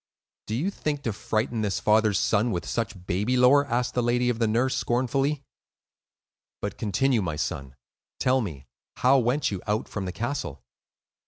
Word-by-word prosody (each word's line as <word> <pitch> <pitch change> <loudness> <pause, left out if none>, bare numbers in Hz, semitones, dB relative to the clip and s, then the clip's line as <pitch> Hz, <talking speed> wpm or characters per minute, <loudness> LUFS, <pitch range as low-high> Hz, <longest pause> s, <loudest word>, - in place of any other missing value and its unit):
"Did 110 - -2
you 165 +11 0
think 145 -6 -3
to 115 - -1
frighten 110 +2 -1
his 100 -2 0
father's 110 -1 +3
son 110 +2 +2
with 90 -4 -2
such 110 -6 -3
baby 105 +8 0
lore?" 140 +3 +5
asked 125 0 0
the 125 - +1
lady 120 +1 +2
of 120 -2 -1
the 115 - +2
nurse, 120 +4 +1
scornfully. 135 +4 0 1.2
"But 100 -1 -4
continue, 115 +3 +1
my 80 -5 -2
son; 70 -3 -4 0.4
tell 130 +1 +3
me, 75 - -6 0.3
how 135 +2 +5
went 125 +3 +1
you 95 -3 -4
out 105 +1 0
from 100 -3 -4
the 90 - -3
castle?" 100 - -4
115 Hz, 170 wpm, -26 LUFS, 100-125 Hz, 1.2 s, lore